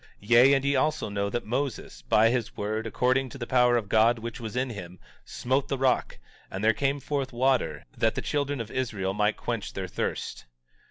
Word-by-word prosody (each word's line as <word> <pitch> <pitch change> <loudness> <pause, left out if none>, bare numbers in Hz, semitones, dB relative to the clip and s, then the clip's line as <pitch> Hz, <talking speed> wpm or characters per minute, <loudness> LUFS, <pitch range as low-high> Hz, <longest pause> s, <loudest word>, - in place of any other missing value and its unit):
17:29 100 - -16
Yea, 125 +4 +7
and 135 0 -1
ye 140 0 +2
also 145 -3 0
know 100 0 -1
that 120 +4 -3
Moses, 120 - -3
by 105 - +4
his 120 -3 -2
word 110 +2 -2
according 130 +3 +1
to 135 - -10
the 120 - -4
power 125 -1 +4
of 110 -4 -3
God 115 +3 +4
which 115 +1 -6
was 115 -1 -6
in 130 0 -1
him, 90 -4 -8 0.3
smote 130 +2 -1
the 135 - -2
rock, 130 -1 +1 0.3
and 95 +2 -5
there 110 +1 +5
came 140 +5 0
forth 140 -1 -3
water, 120 - 0
that - - +1
the - - -2
children 145 -1 -1
of 115 -1 -5
Israel 105 -7 -2
might 105 +1 +1
quench 115 -4 -4
their 95 -1 -4
thirst. 85 - -4
120 Hz, 210 wpm, -27 LUFS, 105-130 Hz, 0.3 s, Yea